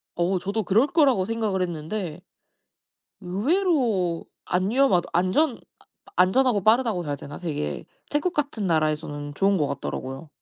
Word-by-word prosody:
어우. 180 +2 +1
저도 200 +4 -2
그럴 220 +9 +3
거라고 270 - +3
생각을 215 -3 -1
했는데 175 0 -4 1.0
의외로 215 - +1 0.2
안 185 +2 0
위험하다, 245 -8 +3
안전 205 - +2
아 - - -21 0.5
아 - - -18
안전하고 215 +1 +3
빠르다고 220 -5 +3
해야 145 - -2
되나? 140 +1 -9
되게 145 - -4 0.3
태국 300 +5 0
같은 280 - -2
나라에서는 155 -2 -1
좋은 195 +3 +2
것 150 - +1
같더라고요. 135 +1 -5
190 Hz, 335 characters per minute, -25 LUFS, 165-235 Hz, 1.0 s, 그럴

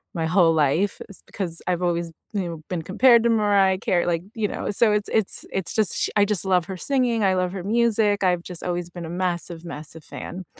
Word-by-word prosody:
my 165 -1 -1
whole 165 -1 +3
life. 160 +6 +1
It's 200 - -10
because 175 -4 -5
I've 180 0 -1
always, 170 -1 -1 0.2
you 200 - -1
know, 165 -2 -8
been 175 -3 -3
compared 235 +7 +4
to 235 - +2
Mariah 200 -4 +3
Carey, 175 -2 0
like, 170 -1 -1
you 220 -2 -1
know, - - -4
so 215 +2 +4
it's 210 0 0
it's 220 -3 +1
it's 190 -2 -3
just 215 -3 +3
sh - - 0
I 205 -1 +4
just 200 -2 +5
love 180 -2 +2
her 190 +1 -7
singing. 245 -2 0
I 190 -1 +2
love 180 -1 -1
her 190 -2 -6
music. 215 -2 +1
I've 180 -2 +2
just 175 -2 -5
always 175 -1 -3
been 175 -1 -8
a - - -7
massive, 175 -1 -3
massive 160 -1 -9
fan. 185 +1 -8
185 Hz, 225 wpm, -23 LUFS, 170-205 Hz, 0.2 s, just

